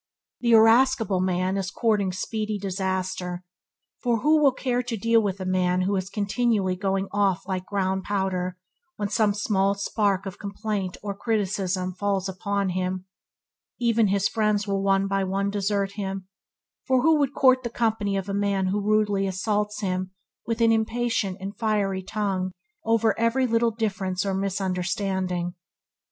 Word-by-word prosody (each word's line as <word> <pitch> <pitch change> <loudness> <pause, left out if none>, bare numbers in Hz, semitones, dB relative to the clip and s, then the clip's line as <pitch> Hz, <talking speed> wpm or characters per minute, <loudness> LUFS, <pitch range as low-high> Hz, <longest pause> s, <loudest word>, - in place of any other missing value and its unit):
The 235 -1 +2
irascible 225 -2 +5
man 185 +1 0
is 190 -1 -2
courting 205 -3 +1
speedy 215 +3 -3
disaster, 185 -2 -3 0.6
for 235 -3 +1
who 305 +1 +4
will 280 -2 +6
care 250 -1 -1
to 245 -2 -4
deal 230 +2 +3
with 200 -2 -2
a 185 - -4
man 185 0 +1
who 190 +1 +1
continually 205 -2 +1
going 195 +1 -1
off 195 -2 +1
like 185 -1 -3
ground 190 -1 0
powder 185 -2 -1 0.4
when 205 -1 -3
some 205 0 +2
small 200 -1 +1
spark 200 -1 0
of 195 - -7
complaint 200 -2 -3
or 200 -1 -3
criticism 195 -4 -1
falls 195 0 -1
upon 200 +1 -1
him! 185 0 -2 0.7
Even 230 -2 +3
his 200 0 +2
friends 210 -2 0
will 195 -1 0
one 195 0 +2
by 195 0 0
one 195 +1 -1
desert 200 -1 0
him, 195 -2 -5 0.6
for 260 -2 +3
who 320 0 +5
would 280 -1 0
court 255 -1 +5
the 240 - -4
company 220 -4 0
of 195 0 -3
a 200 - -3
man 200 -2 +1
who 205 +2 0
rudely 205 -1 +2
assaults 210 +3 -1
him 185 -1 -1 0.4
with 230 0 -1
an 230 0 +5
impatient 225 -3 0
and 195 +2 -6
fiery 205 -4 0
tongue 190 -2 -2 0.3
over 225 -1 +3
every 230 +3 +2
little 230 -1 +2
difference 195 -4 -2
or 195 - 0
misunderstanding. 190 -1 -1
200 Hz, 155 wpm, -25 LUFS, 190-220 Hz, 0.7 s, will